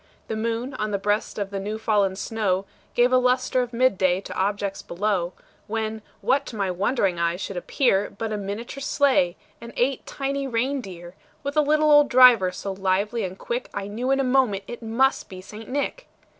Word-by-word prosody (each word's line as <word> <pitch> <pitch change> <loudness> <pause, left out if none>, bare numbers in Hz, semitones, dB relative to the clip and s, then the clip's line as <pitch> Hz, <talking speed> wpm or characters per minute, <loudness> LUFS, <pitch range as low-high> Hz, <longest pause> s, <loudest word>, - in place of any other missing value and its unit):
The 220 - -2
moon, 230 +4 -2
on 215 -4 -2
the 200 - 0
breast 205 +2 -1
of 200 -1 -3
the 200 - -3
new 210 +3 -4
fallen 205 -3 +1
snow, 200 -2 -1 0.3
Gave 245 +1 +4
a 255 - +6
lustre 255 0 +2
of 245 -1 -4
mid 255 -4 +2
day 185 -1 +3
to - - -8
objects 200 0 -1
below; 180 -1 -1 0.3
When, 220 0 -3 0.2
what 265 +6 +1
to 235 - -7
my 195 -3 -1
wondering 195 -1 0
eyes 170 +1 0
should 195 - -5
appear, 200 - +1
But 220 +1 -4
a - - -1
miniature 210 +7 -5
sleigh, 270 -11 +2 0.2
and 235 0 -9
eight 260 +1 +1
tiny 275 0 -2
rein 260 +3 0
deer, 175 -4 -10 0.3
With 280 +1 -3
a 305 - +5
little 305 +1 +3
old 295 -1 +6
driver, 245 -7 +7
so 195 +2 -5
lively 195 +4 0
and 185 0 -5
quick, 240 +4 -4
I 200 -1 -3
knew 235 +5 -3
in 270 0 +3
a - - +2
moment 250 -7 +2
it 240 +4 -8
must 235 +4 +1
be 185 - -9
St. 210 +4 -10
Nick. 285 - -3
220 Hz, 200 wpm, -24 LUFS, 195-255 Hz, 0.3 s, driver